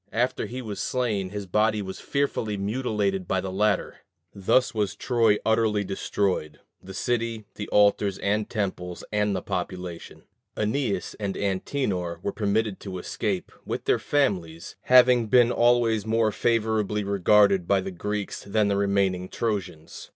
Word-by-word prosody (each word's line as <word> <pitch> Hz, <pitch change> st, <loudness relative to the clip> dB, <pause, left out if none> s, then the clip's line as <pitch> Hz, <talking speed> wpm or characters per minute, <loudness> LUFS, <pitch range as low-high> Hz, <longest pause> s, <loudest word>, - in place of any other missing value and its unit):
After 125 Hz, +2 st, 0 dB
he 130 Hz, +1 st, -6 dB
was 105 Hz, -3 st, -6 dB
slain, 110 Hz, -7 st, -1 dB
his 100 Hz, 0 st, -5 dB
body 105 Hz, +3 st, +1 dB
was 95 Hz, -2 st, -6 dB
fearfully 115 Hz, -7 st, -1 dB
mutilated 100 Hz, -3 st, -1 dB
by 95 Hz, -, +1 dB
the 95 Hz, 0 st, -4 dB
latter. 100 Hz, +1 st, 0 dB, 0.4 s
Thus 100 Hz, +6 st, +2 dB
was 105 Hz, -2 st, -1 dB
Troy 115 Hz, -2 st, +2 dB
utterly 110 Hz, -2 st, +2 dB
destroyed 95 Hz, -5 st, -2 dB, 0.2 s
the 95 Hz, 0 st, -10 dB
city, 115 Hz, -1 st, -1 dB
the 105 Hz, -, -6 dB
altars 100 Hz, -1 st, +3 dB
and 105 Hz, +1 st, -1 dB
temples, 90 Hz, -4 st, -3 dB
and 105 Hz, -1 st, +1 dB
the -, -, -3 dB
population. 90 Hz, -2 st, -5 dB, 0.3 s
Æneas 110 Hz, -3 st, -1 dB
and 100 Hz, -2 st, -2 dB
Antenor 95 Hz, -3 st, -2 dB
were 100 Hz, -, -1 dB
permitted 105 Hz, 0 st, -1 dB
to 95 Hz, -2 st, -6 dB
escape, 90 Hz, -, -3 dB
with -, -, -4 dB
their -, -, +2 dB
families, 90 Hz, -, -1 dB
having 125 Hz, -2 st, +6 dB
been 120 Hz, +1 st, +5 dB
always 120 Hz, -3 st, +3 dB
more 110 Hz, 0 st, +1 dB
favorably 110 Hz, -2 st, 0 dB
regarded 100 Hz, -1 st, +3 dB
by 100 Hz, -, +3 dB
the 95 Hz, 0 st, -4 dB
Greeks 105 Hz, +3 st, -4 dB
than 105 Hz, 0 st, +1 dB
the 100 Hz, -, +1 dB
remaining 100 Hz, -2 st, +1 dB
Trojans. 95 Hz, -8 st, -4 dB
105 Hz, 145 wpm, -25 LUFS, 95-115 Hz, 0.4 s, having